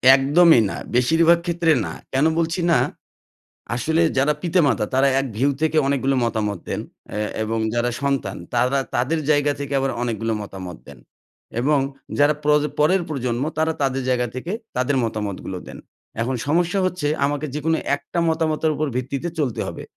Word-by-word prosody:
একদমই 145 +1 +5
না - - -5 0.2
বেশিরভাগ 165 +7 +4
ক্ষেত্রে 170 -1 +2
না। - - -5 0.2
কেন 135 +3 +3
বলছি 165 +2 0
না? - - +5 1.0
আসলে 160 +7 +1 0.2
যারা 140 +3 +3
পিতা-মাতা, 150 - +2
তারা 135 +1 +4
এক 135 - -1
ভিউ 135 +4 +3
থেকে 160 0 +1
অনেকগুলো 135 -1 +1
মতামত 105 -5 -1
দেন - - -2 0.3
অ্যা 105 0 -2 0.2
এবং 110 +1 -2
যারা 120 +1 +1
সন্তান, 135 -8 -1 0.2
তারা 125 +3 +2 0.2
তাদের 145 +7 +1
জায়গা 145 -1 +3
থেকে 140 0 -4
আবার 135 0 0
অনেকগুলা 115 -1 -1
মতামত 95 -4 -8
দেন। - - -12 0.6
এবং 145 +3 +3 0.4
যারা 145 +1 +5
প্র 150 - 0 0.3
পরের 175 +5 +4
প্রজন্ম 125 -3 -2
তারা 160 0 +1
তাদের 135 -1 0
জায়গা 125 -1 +1
থেকে, 160 +9 -4 0.2
তাদের 130 +2 +1
মতামতগুলো 105 -4 -4
দেন। - - -9 0.4
এখন 130 +3 -1
সমস্যা 175 +5 +2
হচ্ছে, 180 -5 -1 0.2
আমাকে 145 +1 -1
যে 150 - -2
কোনো 160 0 +2 0.2
একটা 170 - -5
মতামতের 160 -1 +1
উপর 155 0 -1
ভিত্তিতে 135 +6 -2
চলতে 130 -7 -1
হবে। - - -6
140 Hz, 160 wpm, -22 LUFS, 120-160 Hz, 1.0 s, একদমই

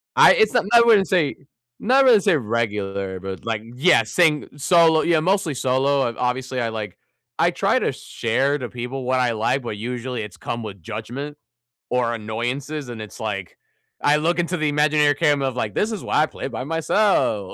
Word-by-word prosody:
I - - +7
It's 440 -8 +2
not 245 - +2
I 235 - +8
wouldn't 220 -5 +4
say 165 -7 +1 0.4
not 265 +5 +3
really 245 -5 +6
say 170 -4 +2
regular, 100 -5 -3
but, 95 +3 -8
like 110 -2 -3
Yeah, 155 +9 +4
saying 160 -4 +1
solo 160 +1 +4
Yeah, 170 -2 +2
mostly 185 -1 0
solo. 135 +2 +1
I've 115 - -6
Obviously, 125 +1 -2
I 115 - -1
like 105 -4 -6 0.4
I - - +3
try - - +1
to - - 0
share 135 +5 -1
to 125 - -5
people 125 +2 -6
what 130 +1 0
I 125 -2 +1
like, 115 +4 -1
but 110 -3 -5
usually 125 +2 -4
it's 105 -1 -9
come 120 - -5
with 100 -4 -9
judgment 120 - -6 0.5
or 125 -2 0
annoyances, 125 +6 -4
and 120 -2 -7
it's 105 - -10
like, 100 -5 -5 0.4
I 145 +1 +3
look 170 +3 0
into 175 +1 -1
the 155 -2 0
imaginary 150 0 +3
camera 145 -2 +1
of, 125 - -9
like, 110 -5 -3
"This 215 - 0
is 215 - -5
why 150 - +2
I - - +2
play 155 - -7
by 125 -1 -5
myself." 165 - 0
130 Hz, 195 wpm, -22 LUFS, 115-155 Hz, 0.5 s, I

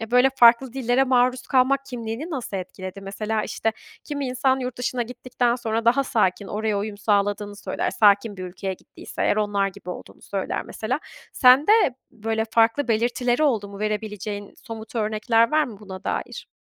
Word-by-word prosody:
eee, 225 0 -6
böyle, 250 +2 +5
farklı 235 +1 +6
dillere 260 0 +2
maruz 255 0 +2
kalmak 275 +1 +3
kimliğini 240 +6 -5
nasıl 250 -8 -4
etkiledi? 185 +1 -7
Mesela, 210 +2 -2
işte, 225 - -2 0.3
kimi 285 -2 -3
insan 260 +1 +1
yurt 250 -1 -5
dışına 245 0 -1
gittikten 245 0 -1
sonra 230 -1 -2
daha 270 +4 +4
sakin, 205 -5 +1
oraya 210 0 -1
uyum 205 0 -4
sağladığını 205 0 0
söyler, - - -2
sakin 205 0 +3
bir 185 - -6
ülkeye 185 +1 -4
gittiyse - - -8
eğer - - +2
onlar 205 -2 +1
gibi 180 -1 -9
olduğunu - - -10
söyler 195 -2 -3
mesela. 245 +6 -3 0.3
Sende 265 +9 +6 0.4
böyle 220 -1 -2
farklı 230 +5 +3
belirtileri 240 +4 +1
oldu 225 -9 +1
mu, 200 0 -10
verebileceğin 210 -1 -4
somut 225 0 -8
örnekler 225 +2 +2
var 310 0 +3
mı, 225 -7 -9
buna 190 -2 -9
dair? - - -4
225 Hz, 165 wpm, -24 LUFS, 205-250 Hz, 0.4 s, farklı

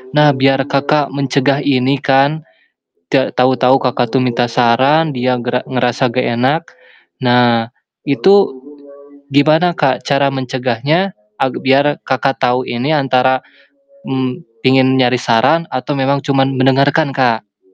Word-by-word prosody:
Nah 150 -1 +5
biar 135 0 +2
Kakak 140 +1 0
mencegah 140 0 0
ini 135 -1 0
kan, 140 +4 +1 0.7
te 135 -1 +1
tahu-tahu 130 +1 +2
Kakak 125 -2 -1
tuh 130 - +3
minta 120 -1 0
saran 130 +6 +2
dia 125 0 0
gera 125 +1 -2
ngerasa 125 0 -1
gak 125 +1 -2
enak, 135 +7 +1 0.6
nah 120 -2 +2 0.4
itu 170 +8 +3 1.0
gimana 155 +4 +3
Kak, 135 -5 0
cara 140 0 +1
mencegahnya, 135 - -2 0.3
ag 130 - 0
biar 140 +2 +2
Kakak 135 0 -1
tahu 125 +1 +1
ini 120 +5 -3
antara, 130 -2 +1 0.7
mmm, 130 +4 -3 0.2
pingin 130 0 +3
nyari 125 -1 +2
saran 140 +9 +1
atau 130 +3 -3
memang 140 +1 0
cuman 135 -1 0
mendengarkan 140 +3 +2
Kak. 110 -6 -1
130 Hz, 130 wpm, -15 LUFS, 125-140 Hz, 1.0 s, Nah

